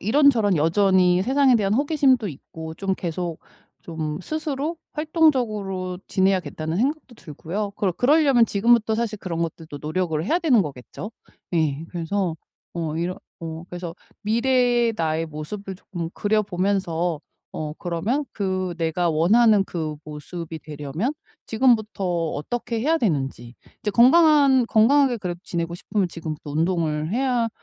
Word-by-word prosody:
이런저런 225 - +4
여전히 180 +2 +3
세상에 265 +1 +4
대한 205 -1 +1
호기심도 270 -5 +2
있고 160 +2 -9
좀 195 +1 -1
계속 170 -1 -4 0.4
좀 160 -2 -4
스스로 310 - -3 0.2
활동적으로 215 - 0
지내야겠다는 185 -4 0
생각도 270 +2 -1
들고요. 190 +3 -5
그러 190 -4 0
그러려면 270 - +4
지금부터 220 +2 +3
사실 220 -2 -2
그런 170 -4 -4
것들도 160 -3 -6
노력을 160 0 -1
해야 330 - +2
되는 265 - +4
거겠죠. 145 - -8 0.4
예 155 -1 0
그래서 175 0 -2 0.4
어 160 -2 -3
이러 175 +2 -2 0.2
어 165 0 -6
그래서 175 -1 -6 0.3
미래의 240 +1 +2
나의 160 0 0
모습을 190 +6 -6
조금 175 -3 -6
그려보면서 185 -5 0 0.3
어 155 -1 -4
그러면 195 - -1
그 185 -3 -2
내가 165 +1 0
원하는 205 +6 +4
그 155 -5 -4
모습이 160 +2 -7
되려면 150 - -3 0.3
지금부터 220 -4 +2 0.3
어떻게 230 +10 -3
해야 320 +6 +2
되는지 135 - -2 0.3
이제 210 - 0
건강한 275 - +5
건강하게 255 +3 +4
그래도 180 -4 -5
지내고 170 -3 -3
싶으면 200 +2 -1
지금부터 155 -3 -6
운동을 160 0 0
해야 245 -2 +1
190 Hz, 330 characters per minute, -23 LUFS, 165-235 Hz, 0.4 s, 건강한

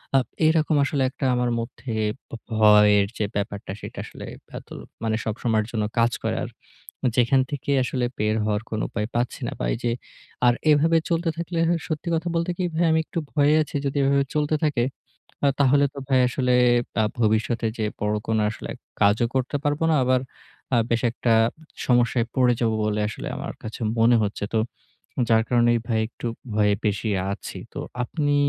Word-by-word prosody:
আ - - +8 0.3
এরকম 160 -1 +2
আসলে 140 0 -1
একটা 135 +1 -5
আমার 125 0 +1
মধ্যে 120 +1 -6 0.4
ব - - -29 0.2
ভয়ের 105 -2 +6
যে, 105 - 0
ব্যাপারটা 100 -1 -3
সেটা - - -8
আসলে - - -9 0.2
ভেতরে - - -9 0.3
মানে 110 -1 +1
সবসময়ের 110 0 0
জন্য 110 -2 -1 0.2
কাজ 115 +1 +4
করে - - 0
আর - - -5 0.7
যেখান 125 +2 +4
থেকে 145 -1 -4
আসলে, 125 0 -1
বের 105 +1 +1
হওয়ার 105 0 0
কোন 110 -1 -2
উপায় 105 -2 -2
পাচ্ছি 120 +1 -1
না। - - -4
বা - - -3
এইযে 120 0 -1 0.5
আর 120 - +5 0.2
এইভাবে 155 +3 +4
চলতে 170 0 +1
থাকলে 170 0 -3 0.3
সত্যি 155 0 -3
কথা 165 +2 -1
বলতে 170 +1 0
কি 185 - 0
ভাই 170 - +2
আমি 160 - +3
একটু 170 - -5
ভয়ে 145 0 +4
আছি। 150 - -6
যদি 135 - -2
এভাবে 140 0 +3
চলতে 150 0 +1
থাকে 145 -6 +1 0.8
তাহলে 140 +1 +5
তো 140 - -8
ভাই 130 -2 +4
আসলে 125 0 0 0.5
আ - - +3 0.2
ভবিষ্যতে 115 +1 +1
যে 110 - 0 0.2
বড়ো 105 0 0 0.3
আসলে 110 - -8
এক - - -14 0.2
কাজও 105 +4 +4
করতে 130 +2 0
পারবো 145 +1 0
না। 155 - +4
আবার 130 0 +2 0.5
আ - - +5
বেশ 115 0 +1
একটা 120 -1 0 0.5
সমস্যায় 120 -1 +3
পড়ে 125 -1 +4
যাবো 115 -2 +2
বলে 105 0 0
আসলে 110 - -6
আমার - - -5
কাছে 110 +2 -7 0.2
মনে 120 +1 +5
হচ্ছে। 105 0 -2
তো - - +4 0.7
যার 110 -1 +4
কারণে 120 -1 +4 0.2
ভাই 110 -2 +1
একটু 120 - -8 0.3
ভয়ে 105 -1 +3
বেশী 105 +1 0 0.2
আছি। - - -7
তো - - -7 0.2
আপনি 145 +3 0
120 Hz, 175 wpm, -24 LUFS, 110-145 Hz, 0.8 s, আ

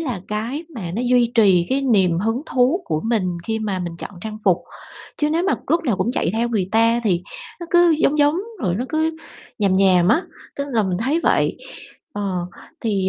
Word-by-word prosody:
là 250 - -3
cái 235 +10 -3
mà 185 -8 -5
nó 230 - -1
duy 245 -1 +3
trì 190 -7 +4
cái 270 +1 +1
niềm 190 -10 +3
hứng 225 +7 -1
thú 265 +9 +2
của 155 - -2
mình 185 -7 0
khi 220 0 -2
mà 205 -4 -2
mình 175 -2 -5
chọn - - -7
trang 215 +2 -6
phục, 185 -4 +4 0.6
chứ 300 0 0
nếu 330 +2 +1
mà 385 - +2
lúc 335 0 +1
nào 235 -9 +1
cũng 235 - 0
chạy 170 - 0
theo 230 +2 0
người 205 -6 -1
ta 230 +1 +3
thì 180 -5 +1 0.4
nó 345 - -6
cứ 350 -1 +5
giống 300 -1 +2
giống, 290 +2 +4 0.3
rồi 180 -3 0
nó 235 +7 -2
cứ 315 +1 0 0.4
nhàm 195 -3 +2
nhàm 185 -2 +4
á, 280 - +3 0.3
tức 280 - -2
là 225 -2 +2
mình 185 -3 -1
thấy 275 +9 0
vậy. - - +2 0.6
Ờ, 190 -4 -3 0.3
thì, 200 -4 0
225 Hz, 210 wpm, -21 LUFS, 190-265 Hz, 0.6 s, cứ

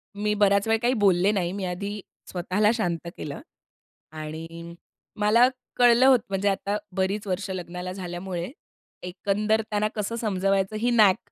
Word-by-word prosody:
मी 210 +1 0
बराच 200 +1 +3
वेळ 225 0 +3
काही 245 +1 +2
बोलले 185 +1 +4
नाही. 180 -4 -1
मी 195 -1 -3
आधी 200 +4 -4 0.3
स्वतःला 185 +4 +1
शांत 175 -7 -2
केलं 145 -2 -6 0.7
आणि 165 +2 -8 0.4
मला 220 +4 +5 0.3
कळलं 245 +1 +6
होतं, 255 -3 +6
म्हणजे 195 +1 +1
आता 200 +1 -1 0.2
बरीच 195 +2 -1
वर्षं 190 +1 -2
लग्नाला 180 0 -6
झाल्यामुळे 180 0 -5 0.5
एकंदर 205 +4 0
त्यांना 210 0 +1
कसं 215 +2 -2
समजवायचं 195 -1 0
ही 240 +3 +1
नॅक 210 -5 +5
195 Hz, 145 wpm, -25 LUFS, 180-210 Hz, 0.7 s, कळलं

